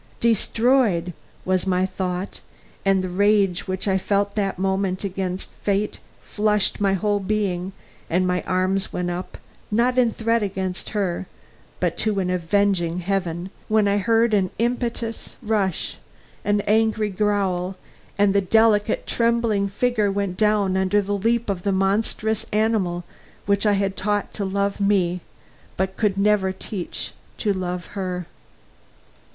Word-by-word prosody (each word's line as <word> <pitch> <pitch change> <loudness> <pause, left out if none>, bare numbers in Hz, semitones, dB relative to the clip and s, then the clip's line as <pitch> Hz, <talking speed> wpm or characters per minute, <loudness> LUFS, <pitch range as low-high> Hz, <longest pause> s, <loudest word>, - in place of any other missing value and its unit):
"Destroyed!" 225 -5 +2 0.3
was 185 0 +1
my 185 0 +2
thought; 185 0 -4 0.4
and 195 -1 +3
the - - -2
rage 195 -1 +2
which 185 +2 -2
I 190 -1 +2
felt 200 +1 0
that 195 -3 -1
moment 190 0 0
against 190 -1 -3
fate 205 +1 0 0.2
flushed 210 -1 +1
my 195 -1 +3
whole 205 +2 +1
being, 195 -2 -1 0.4
and 180 +2 +2
my 180 0 +1
arms 185 +1 +1
went 175 0 -2
up, 180 +1 -5 0.3
not 245 +4 +2
in 240 -2 +4
threat 230 +1 +1
against 190 -2 -3
her, 190 -2 -1 0.5
but - - 0
to 215 -2 +1
an 180 -1 0
avenging 180 -1 +1
Heaven, 180 -1 -2 0.2
when 215 -1 +3
I 200 0 +2
heard 225 +2 +3
an 190 -3 +3
impetuous 235 -1 -2
rush, 210 -6 -1 0.5
an 205 0 +2
angry 220 0 +2
growl, 195 -2 0 0.4
and 200 -1 +4
the 200 - +4
delicate, 215 +2 +3
trembling 230 -4 +1
figure 215 -1 +1
went 195 -2 -2
down 210 -2 +2
under 190 +2 +2
the 200 +1 -2
leap 230 +4 +1
of 195 -3 -2
the 200 - 0
monstrous 205 +3 0
animal 210 -5 +1 0.4
which 200 +1 +2
I 205 - +4
had 195 -1 0
taught 205 +2 -1
to 200 - -3
love 200 +1 -1
me, 185 -3 +2 0.6
but 190 0 -1
could 205 -3 +1
never 200 -1 +3
teach 190 -1 -5 0.3
to 210 -3 +1
love 180 -2 -3
her. 180 -3 -3
200 Hz, 145 wpm, -23 LUFS, 185-210 Hz, 0.6 s, in